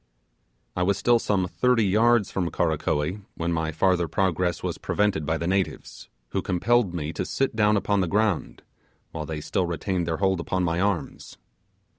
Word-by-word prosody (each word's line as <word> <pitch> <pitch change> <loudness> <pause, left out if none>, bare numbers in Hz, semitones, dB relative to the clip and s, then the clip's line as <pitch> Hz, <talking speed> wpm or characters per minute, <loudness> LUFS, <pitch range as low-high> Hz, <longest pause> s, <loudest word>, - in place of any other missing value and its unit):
I 90 - -1
was 95 +2 +2
still 120 +3 +3
some 95 -5 0
thirty 125 +3 +2
yards 110 +2 +3
from 90 -3 -1
Karakoee 80 +3 -1 0.2
when 85 +1 -1
my 80 -1 -1
farther 85 +1 +2
progress 90 0 0
was - - -3
prevented 100 -8 0
by 80 0 +1
the 85 - -4
natives, 95 +1 -2 0.2
who - - -1
compelled 105 +3 +1
me 80 -2 -4
to - - -2
sit 135 -4 -1
down 105 -1 +3
upon 100 0 +1
the 90 - 0
ground, 105 -1 0 0.5
while 80 -2 -5
they 80 -2 -4
still 90 +4 -1
retained 85 +1 -2
their 80 -1 -1
hold 95 -2 +1
upon 90 +2 -1
my 85 0 0
arms. 100 -4 -3
90 Hz, 175 wpm, -25 LUFS, 85-105 Hz, 0.5 s, still